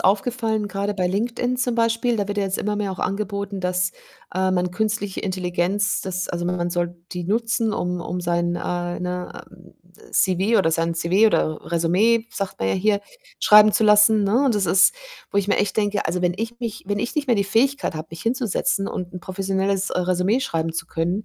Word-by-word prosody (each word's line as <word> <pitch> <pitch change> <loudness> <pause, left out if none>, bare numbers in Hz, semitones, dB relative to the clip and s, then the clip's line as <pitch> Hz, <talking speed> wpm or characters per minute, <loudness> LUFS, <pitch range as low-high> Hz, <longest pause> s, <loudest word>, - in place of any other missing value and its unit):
aufgefallen, 220 +1 +1
grade 200 +1 -2
bei 185 -2 0
LinkedIn 235 +6 -1
zum 245 -2 0
Beispiel, 230 +1 +1
da 205 - -1
wird 205 0 -3
ja - - +2
jetzt 190 0 -2
immer 210 0 -1
mehr 205 -1 -2
auch 190 - -6
angeboten, 200 0 -3
dass, 180 0 0 0.4
ähm, 185 0 +1
man 180 0 0
künstliche 210 -1 -2
Intelligenz 185 +1 -1
dass 185 0 -3
also, 175 0 -3
man 175 -1 -1
soll 175 0 -2 0.2
die 180 -1 -4
nutzen, 225 +3 0
um 180 -2 -2
um 180 +1 -4
sein, 175 0 0
äh, 175 0 -3
ne, 180 0 -5 0.5
äh, - - -18
CV 195 +4 +2
oder 160 -4 +2
sein 165 +1 0
CV 180 +6 +3
oder 155 -6 0
Résumé, 190 +8 +2
sagt 195 -1 -4
man 95 - -1
ja - - +1
hier, 200 +1 +1 0.4
schreiben 210 0 +7
zu 220 - +2
lassen, 210 0 +5
ne? 235 +8 +2
Und 250 - +2
das 195 -3 +1
ist 185 - +5 0.4
wo 200 - +1
ich 195 - 0
mir 205 - +1
echt 205 -1 0
denke: 205 -1 0
„Also, 175 +3 -1
wenn 175 0 +1
ich 230 +3 -4
mich 230 -3 -5
wenn 205 0 -1
ich 235 - -3
nicht 290 -3 -1
mehr 235 - +4
die 200 - +1
Fähigkeit 265 - +1
habe, 155 +1 -6
mich 165 -1 -9
hinzusetzen 225 -4 0
und 180 -1 -5
'n 180 - -6
professionelles, 195 +1 -1
äh, - - -1
Résumé 185 +6 +1
schreiben 165 -10 -2
zu 165 0 -4
können, 175 +6 -2
195 Hz, 210 wpm, -22 LUFS, 180-215 Hz, 0.5 s, schreiben